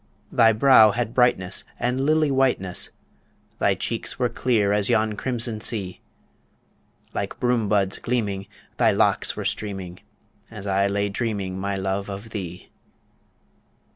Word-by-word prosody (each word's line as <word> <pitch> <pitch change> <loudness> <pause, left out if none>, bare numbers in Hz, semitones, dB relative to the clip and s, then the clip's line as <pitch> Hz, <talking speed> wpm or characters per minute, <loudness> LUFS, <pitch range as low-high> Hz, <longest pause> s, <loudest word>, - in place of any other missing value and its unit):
Thy 115 -1 +5
brow 110 -1 +6
had 120 -1 -2
brightness 120 -8 +2 0.2
and 125 +2 0
lily 155 +1 +2
whiteness, 130 -9 +1 0.7
Thy - - +3
cheeks - - -4
were 125 -1 +1
clear 110 -4 +1
as 105 +1 +1
yon 110 -2 +2
crimson 115 -1 -3
sea; 100 -7 -3 1.1
Like - - -4
broom 120 -4 +1
buds 100 -2 +1
gleaming, 100 -5 -2 0.3
thy - - +4
locks - - +1
were - - -5
streaming, 95 -4 -4 0.5
As 105 -3 -8
I 100 0 +2
lay 100 0 0
dreaming, 100 -3 -3
my 100 +1 -2
love, 95 +1 -2
of 100 +3 -7
thee. 90 -4 -6
105 Hz, 135 wpm, -24 LUFS, 100-120 Hz, 1.1 s, brow